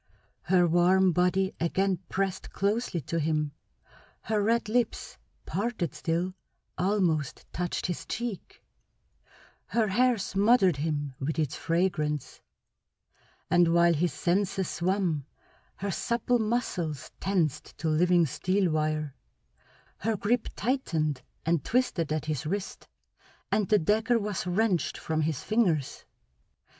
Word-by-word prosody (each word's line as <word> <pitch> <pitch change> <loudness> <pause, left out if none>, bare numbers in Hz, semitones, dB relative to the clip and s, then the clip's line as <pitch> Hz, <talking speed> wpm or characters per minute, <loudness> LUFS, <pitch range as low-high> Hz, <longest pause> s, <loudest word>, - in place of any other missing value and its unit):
Her 180 -1 +3
warm 180 +2 +4
body 180 +2 +2
again 185 +2 +1
pressed 195 -1 -2
closely 200 -3 -1
to 165 +5 -2
him, 150 -1 0 0.7
her 215 -1 0
red 230 +2 +1
lips, 235 +1 -1 0.3
parted 200 - -2
still, 175 +2 -1 0.4
almost 175 -7 0
touched 175 0 -2
his 175 - -3
cheek; 235 -5 -5 1.0
her 220 -3 +1
hair 245 +4 +3
smothered 195 - +3
him 145 -2 -2
with 145 +4 -2
its 150 -4 0
fragrance; 165 -4 -1 1.1
and 175 -1 +4
while 170 0 +5
his 165 +2 +1
senses 190 +1 0
swam 175 -6 -1 0.5
her 200 0 -3
supple 240 +5 0
muscles 210 - -2
tensed 180 -7 -1
to 160 - -3
living 175 +2 +4
steel 185 +5 0
wire, 155 -2 -1 0.8
her 220 +1 -1
grip 225 +4 0
tightened 160 - -1 0.2
and 165 -1 +1
twisted 220 -11 0
at 155 -1 -1
his 150 -2 -2
wrist, 195 +3 -4 0.6
and 205 -1 +1
the 210 - +6
dagger 215 +7 +2
was 205 -4 -3
wrenched 180 -4 +1
from 160 -1 -1
his 155 -3 -1
fingers. 180 - 0
180 Hz, 120 wpm, -28 LUFS, 160-205 Hz, 1.1 s, the